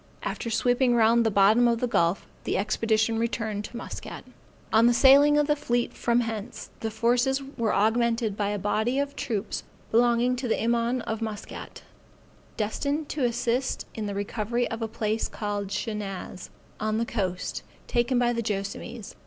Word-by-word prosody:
After 230 - -3
sweeping 245 +2 +2
round 230 +1 +4
the 225 - +2
bottom 215 +4 +5
of 235 -1 +1
the 250 - +1
gulf, 175 -6 +1 0.2
the - - -1
expedition 220 +2 +1
returned 225 -3 -2
to 240 - -8
Muscat. 245 - -7 0.5
On 225 +2 +6
the 240 - +4
sailing 285 +3 +7
of 295 - +4
the 295 0 +2
fleet 240 -4 -1
from 240 0 +1
hence, 225 0 -5
the 225 - -2
forces 245 +5 +1
were 225 -2 0
augmented 230 +1 +1
by 205 -1 -1
a 205 - -1
body 220 +6 0
of 280 0 -1
troops 225 -6 -3 0.3
belonging 240 +2 +3
to 250 0 -3
the 225 - +2
Imaun 235 +2 +1
of 220 0 -4
Muscat, 220 -1 -6 0.7
destined 280 +8 -2
to 285 -4 0
assist 240 +2 -1
in 215 -2 -4
the 200 - -4
recovery 215 +4 -1
of 225 +1 -4
a 225 - -1
place 220 0 -1
called 205 -1 -3
Shenaz, 200 -3 -5 0.3
on 215 0 0
the 230 - 0
coast, 185 -6 -3 0.2
taken 240 +1 +1
by 240 0 +2
the 235 - -1
Joassamees. 205 +1 -4
230 Hz, 170 wpm, -26 LUFS, 215-245 Hz, 0.7 s, sailing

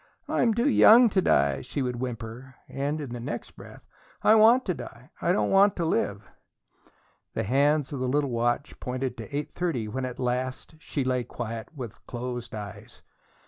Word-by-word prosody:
"I'm 230 -3 +2
too 235 +4 +2
young 240 -3 +7
to 190 -2 +2
die," 70 - +2
she 135 - -3
would 125 -1 -2
whimper. 120 +1 -6
And 145 +3 -2
in 140 -5 -6
the 120 - -5
next 115 - -5
breath: - - -14 0.4
"I 215 - +6
want 225 +4 +6
to 185 - 0
die 125 -2 -10
I 170 - +2
don't 185 - +1
want 195 +1 +5
to 170 - -1
live!" 100 -9 -1 1.1
The - - 0
hands 145 +5 +2
of 140 - -4
the 130 - -1
little 140 +1 +1
watch 120 +4 -1
pointed 130 -1 -3
to 140 - -7
eight 150 - -4
thirty 160 -11 -2
when 130 +4 -3
at 125 -1 -6
last 130 +3 -3
she 145 -3 -3
lay 125 -1 0
quiet, 115 -1 -6
with 120 -6 -8
closed 120 -1 -5
eyes. 100 -3 -9
130 Hz, 185 wpm, -27 LUFS, 120-155 Hz, 1.1 s, young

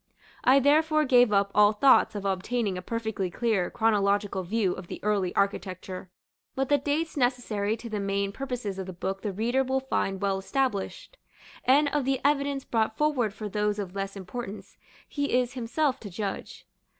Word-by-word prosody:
I 265 +2 +6
therefore 310 +2 +3
gave 245 -4 +5
up 200 -1 +2
all 210 +1 +5
thoughts 220 -1 +4
of 200 -1 -4
obtaining 195 +2 -1
a 180 - -4
perfectly 220 -2 -3
clear 210 -2 0
chronological 205 -3 +1
view 190 0 0
of 185 - -9
the - - -7
early 200 -4 +1
architecture; 185 -2 -2 0.5
but 270 0 -1
the 290 -1 +4
dates 300 +4 -1
necessary 235 -5 0
to 235 - -8
the 215 -2 -3
main 200 0 -1
purposes 240 -5 -4
of 190 - -5
the 185 - -6
book 190 +2 -4
the 210 - -2
reader 235 +7 +1
will 265 +1 0
find 195 -7 -1
well 195 -1 0
established; 260 - -2 0.5
and 285 +3 +5
of 290 -3 -1
the 265 -1 +1
evidence 280 -1 +1
brought 220 -1 0
forward 285 -8 +1
for 215 +1 -6
those 210 0 0
of 195 -3 -5
less 195 0 -4
importance, 200 +2 -7 0.3
he 285 -3 0
is 250 0 -2
himself 260 +3 -1
to 205 - -8
judge. 195 +1 -5
220 Hz, 175 wpm, -27 LUFS, 195-265 Hz, 0.5 s, I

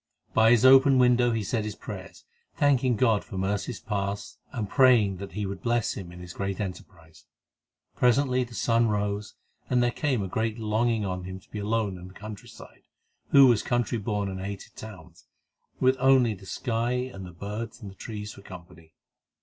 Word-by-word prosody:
By 110 0 +5
his 120 +1 +5
open 135 +1 +7
window 125 -1 +4
he 115 -2 -1
said 110 +3 -1
his 105 -1 -5
prayers, - - -9 0.3
thanking 130 -4 +3
God 110 -2 +2
for 100 - -8
mercies 100 +4 -2
past, 100 -1 -4
and 115 -6 -3
praying 115 -7 +4
that 100 +1 -8
He 105 0 -3
would 95 0 -5
bless 120 -1 0
him 90 -4 -8
in 90 0 -11
his 90 0 -9
great 100 -1 -3
emprise. 80 -5 -8 0.7
Presently 125 +1 +3
the 120 -1 -10
sun 115 +5 +2
rose, 105 0 -2 0.3
and 125 -1 +3
there 120 - +2
came 130 -6 -1
a - - -3
great 110 +3 -2
longing 110 0 0
on 90 -1 -4
him 95 0 -7
to - - -26
be 105 - -5
alone 105 -3 -1
in 90 - -10
the 95 - -14
countryside, 105 -1 -11 0.4
he - - +4
who 140 - +10
was 120 -5 +4
country 120 -1 -1
born 105 -1 -2
and 95 -1 -5
hated 100 0 -7
towns, 90 -6 -12 0.5
with 130 +1 +3
only 130 -3 +4
the 95 -1 -13
sky 120 +1 -1
and 125 -6 -4
the 90 - -9
birds 105 +6 -6
and 105 -5 -9
the - - -16
trees 105 -1 -7
for - - -13
company. 85 -4 -13
110 Hz, 190 wpm, -27 LUFS, 95-120 Hz, 0.7 s, who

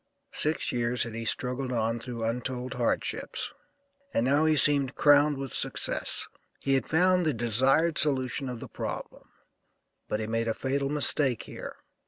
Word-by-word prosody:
Six 155 +1 -1
years 120 0 0
had 115 - -7
he 115 0 -5
struggled 125 +3 -1
on 115 -1 -1
through 115 -1 -6
untold 125 +2 -3
hardships, - - -2 0.6
and 115 - +2
now 145 +4 +3
he 155 -1 +3
seemed 140 -1 +2
crowned 145 0 +4
with 135 -2 -6
success. - - -1 0.3
He 135 - 0
had 135 - 0
found 180 +3 +3
the 155 -3 +1
desired 130 +8 +2
solution 135 -2 0
of 125 -2 -6
the - - -8
problem, - - -7 0.8
but 105 - -1
he 110 - -2
made 115 +1 -1
a 110 - -1
fatal 140 +1 -1
mistake 140 -4 +4
here. - - -8
130 Hz, 160 wpm, -28 LUFS, 120-145 Hz, 0.8 s, crowned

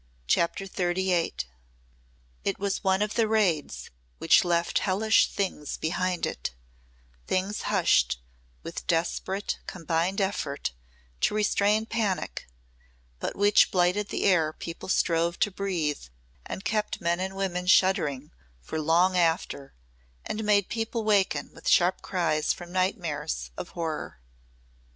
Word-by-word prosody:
CHAPTER 170 - +1
XXXVIII 180 -2 0 1.1
It 195 - -1
was 200 -1 -2
one 190 +1 +3
of 210 - -3
the 225 -2 +2
raids 200 -9 0 0.3
which - - +5
left 170 -1 +1
hellish 215 +3 +3
things 185 -7 -3
behind 180 +2 -1
it 60 - -4 0.7
things 195 +3 -1
hushed 65 - +3 0.4
with - - -7
desperate 180 +4 -1
combined 170 +2 -1
effort 190 - -1 0.5
to - - +1
restrain 210 +1 +2
panic, 220 -5 -2 0.7
but - - -3
which 205 +1 +5
blighted 185 +3 +1
the - - -2
air 165 -5 +3
people 165 +3 -8
strove 170 -2 +1
to 205 - +3
breathe 175 - -2 0.4
and 190 - -6
kept 215 -1 -1
men 170 +1 0
and 190 +1 -3
women 180 -2 -2
shuddering 170 -7 +3 0.3
for 155 - -4
long 175 +4 +3
after 165 -5 0 0.5
and 220 - -3
made 205 -2 +3
people 225 0 -2
waken 205 -3 +1
with - - -4
sharp 180 +1 +4
cries 165 -5 0
from 175 0 -6
nightmares 160 - -2
of - - -6
horror. 160 - -4
185 Hz, 125 wpm, -27 LUFS, 165-200 Hz, 1.1 s, which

